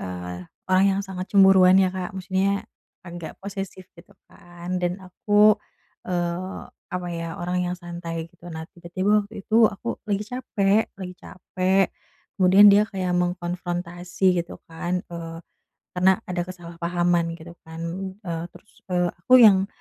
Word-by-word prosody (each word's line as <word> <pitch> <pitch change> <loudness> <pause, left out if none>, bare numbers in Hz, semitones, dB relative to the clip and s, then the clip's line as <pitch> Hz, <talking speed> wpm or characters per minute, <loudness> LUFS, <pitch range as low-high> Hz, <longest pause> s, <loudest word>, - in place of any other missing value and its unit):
eee, 90 -1 -6 0.3
orang 185 +1 +5
yang - - 0
sangat 185 -1 -5
cemburuan 190 -2 +7
ya 190 - +3
Kak, 185 -1 -4
maksudnya 190 +1 -1 0.4
agak 170 -1 -8
posesif 195 -1 -7
gitu 180 +4 -17 0.2
kan, 175 +1 -7
dan 180 +2 -1
aku, 205 +3 +3 0.5
eee, 175 +1 -3 0.3
apa 180 -1 -4
ya 165 0 -5
orang 180 +1 -1
yang 180 +1 -3
santai 170 -2 -6
gitu, 175 0 -13
nah 160 0 -6
tiba-tiba 185 +4 +1
waktu 205 -1 -10
itu 225 +1 +4
aku 225 +3 -5
lagi 205 +1 0
capek 215 -4 0
lagi 180 -1 -7
capek 185 +1 0 0.5
kemudian 190 +2 +7
dia 205 +1 +6
kayak 185 -3 -2
mengkonfrontasi 175 0 -1
gitu 170 - -11
kan, 175 +2 -2
eee, 165 -1 -7 0.6
karena 185 +1 +4
ada 180 -1 -2
kesalahpahaman 175 -1 -1
gitu 170 +1 -11
kan, 160 0 -9 0.4
eee, 170 -3 -4
terus, 215 - -18 0.2
eee, 180 -1 +2
aku 215 - -3
yang 195 -3 +6
180 Hz, 140 wpm, -24 LUFS, 175-195 Hz, 0.6 s, cemburuan